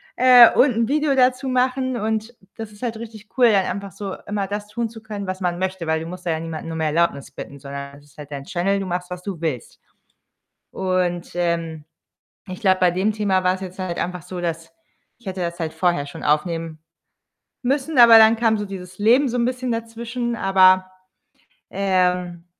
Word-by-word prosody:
äh, 250 -2 +8
und 260 -2 +4
'n 230 0 +1
Video 295 0 +1
dazu 255 +1 +2
machen. 255 0 0
Und 220 +2 -3 0.2
das 225 -2 -7
ist 205 - -17
halt 230 -2 -3
richtig 220 -2 -10
cool, 240 -3 +6
dann 195 -2 +3
einfach 200 +1 -5
so 195 +2 -6
immer 205 -1 -2
das 205 +1 -5
tun 230 +1 -3
zu 225 -1 -13
können, 205 -3 -6
was 185 0 -4
man 175 -1 -2
möchte, 190 -2 -3
weil 160 0 +1
du 165 - -7
musst 180 +1 -9
da 170 - 0
ja 160 - -1
niemanden 165 0 -6
nur 165 - -5
um 160 - -3
Erlaubnis 155 -3 0
bitten, 140 0 -9
sondern 140 0 -8
es 145 - -21
ist 145 0 -24
halt 145 0 -10
dein 140 -1 -6
Channel. 195 +3 0
Du 195 - -4
machst, 180 0 -4
was 180 0 -6
du 195 -5 -5
willst. 155 -8 -4 0.9
Und, 180 -2 -1
ähm, 165 -3 -2 0.6
ich 185 - -7
glaube, 190 -1 +3
bei 180 -1 +4
dem 190 +5 0
Thema 195 -3 0
war's 185 +1 +1
jetzt 185 0 -8
halt 185 -2 -4
einfach 180 -1 -3
so, 180 +3 -7
dass 165 -1 -4 0.5
ich 240 - -25
hätte 185 -1 -4
das 170 0 -4
halt 160 -1 -3
vorher 175 -6 0
schon - - -9
aufnehmen 160 +1 -1 0.8
müssen, 275 +2 -1
aber 235 -1 +9
dann 220 +1 +6
kam 225 -1 +2
so 210 - -3
dieses 185 -2 -9
Leben 245 +7 +4
so 245 - -3
'n 235 - +2
bisschen 255 0 -2
dazwischen. 230 +1 -4
Aber, 185 -2 +4 0.8
ähm, 180 -3 0
190 Hz, 205 wpm, -21 LUFS, 170-225 Hz, 0.9 s, aber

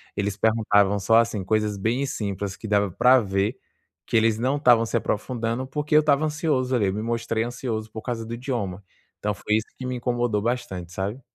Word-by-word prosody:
Eles 100 -1 -1
perguntavam 105 -2 +3
só 110 +4 +3
assim, 115 -3 0
coisas 105 +1 0
bem 115 +7 0
simples, 100 -5 -3
que 110 - -7
dava 100 -2 +2
pra 125 +7 +5
ver 100 +4 -1 0.5
que 120 - +1
eles 110 -1 +3
não 130 +4 +1
estavam 120 -5 +5
se 115 - 0
aprofundando, 115 +3 -2
porque 150 +2 -1
eu 155 - +8
estava 150 0 +2
ansioso, 150 -5 0
ali, 105 -5 +2
eu 95 - 0
me 105 - -3
mostrei 115 0 -1
ansioso 115 -2 -4
por 110 - -7
causa 115 -1 -4
do 115 - -6
idioma. 105 -7 -4 0.4
Então 105 0 -1
foi 105 - -3
isso 110 - -3
que 130 - -6
me 125 0 -2
incomodou 120 -3 0
bastante, 100 -7 -3
sabe. 100 +8 -3
115 Hz, 200 wpm, -24 LUFS, 105-125 Hz, 0.5 s, eu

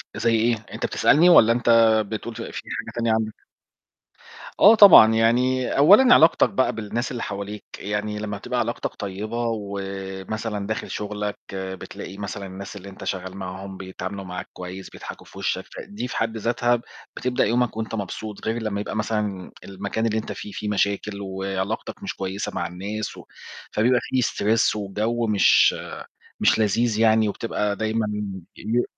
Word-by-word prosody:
زي 115 -1 +2
إيه؟ 115 +2 +2 0.2
أنت - - -3
بتسألني 160 +5 +4
والّا 115 -10 +7
أنت 120 0 -1 0.4
بتقول 110 +2 -5
ف 115 - -6
في - - -6 0.2
حاجة - - -5
تانية 115 -1 +1
عندك؟ 110 -1 -2 1.1
آه 210 +3 +8
طبعًا، 185 - +9
يعني 125 +3 +2
أولًا 205 - +7
علاقتك 160 +1 +5
بقى 130 - +1
بالناس 115 +3 -3
اللي 120 - -4
حواليك، 100 +1 -5 0.2
يعني 105 +1 -3
لمّا 105 -1 -4
بتبقى - - -3
علاقتك - - -2
طيّبة 105 +4 -4
ومثلًا 100 +1 -5
داخل 110 - -3
شُغلك، 105 0 -4 0.2
بتلاقي 95 0 -7
مثلًا 100 0 -5
الناس 95 +1 -8
اللي 100 0 -9
أنت 95 - -11
شغّال 95 0 -4
معاهم 95 0 -7
بيتعاملوا 95 +1 -6
معاك 90 -1 -7
كويس، 90 +1 -8
بيضحكوا - - -10
في - - -15
وِشَّك، - - -1
فدي 110 +5 -6
في 120 - -5
حد 115 0 -1
ذاتها 120 +1 +1 0.3
بتبدأ 125 0 0
يومك 120 0 0
وأنت 110 0 -3
مبسوط، 105 +1 -6
غير 115 +1 -1
لمّا 105 -2 -2
يبقى 105 - -5
مثلًا 105 -3 -2
المكان 100 +3 -3
اللي 110 -1 0
أنت 110 - -4
فيه، 105 - -7
فيه 105 +1 -4
مشاكل 100 0 -1
وعلاقتك 95 +2 -4
مش 95 -1 -4
كويسة 95 +1 -4
مع 85 - -1
الناس 100 +5 -5
و - - -11 0.5
فبيبقى 120 +3 +3
فيه 130 - 0
stress 110 -1 +1
وِجَو 110 +3 -1
مش 105 -2 +5 0.6
مش - - +3
لذيذ 110 +1 +1
يعني، 110 -1 +4
وبتبقى 105 -1 -2
دايمًا 110 +1 -1 0.5
ي 120 +2 0
105 Hz, 160 wpm, -23 LUFS, 100-115 Hz, 1.1 s, طبعًا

